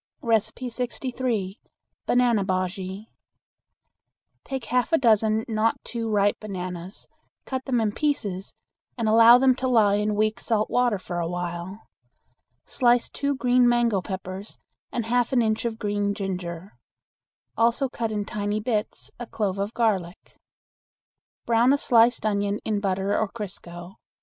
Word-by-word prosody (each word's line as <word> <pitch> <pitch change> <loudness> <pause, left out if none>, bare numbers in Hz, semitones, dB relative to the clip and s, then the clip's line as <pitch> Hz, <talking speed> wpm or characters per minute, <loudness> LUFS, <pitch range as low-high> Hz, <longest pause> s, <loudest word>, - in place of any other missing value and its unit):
63. 235 -1 -2 0.5
Banana 240 -4 +3
Bujea. 190 +1 -3 1.4
Take 265 -3 -5
half 250 +5 0
a 325 - +5
dozen 220 -3 +3
not 225 0 +1
too 230 -2 -4
ripe 205 -1 +2
bananas, 185 -2 -7 0.4
cut 260 -1 -4
them 255 -3 +1
in 220 -2 +1
pieces, 205 -9 -2 0.4
and 230 -2 -1
allow 230 +2 +8
them 260 0 +4
to 260 +1 -3
lie 215 -5 +4
in 210 0 0
weak 215 +2 0
salt 215 -3 -1
water 245 -4 +2
for 175 -2 -5
a 170 - -1
while. 175 +3 -5 0.8
Slice 245 -2 +2
two 280 0 -1
green 250 -2 +3
mango 235 -5 +2
peppers 190 +1 -7 0.3
and 235 - -2
half 245 +2 +1
an 245 -2 +4
inch 220 +1 0
of 225 -1 -2
green 205 -1 -1
ginger; 185 -2 -5 0.8
also 235 +4 +2
cut 230 -3 -3
in 210 -1 -2
tiny 205 +1 -2
bits 215 -1 -3
a 240 - -6
clove 200 -4 -2
of 200 +2 -2
garlic. 195 -7 -1 1.1
Brown 235 +3 +4
a - - +3
sliced 235 -3 +3
onion 205 -1 0
in 215 -2 0
butter 195 0 0
or 220 - +1
crisco. 180 -4 -8
215 Hz, 140 wpm, -25 LUFS, 195-240 Hz, 1.4 s, allow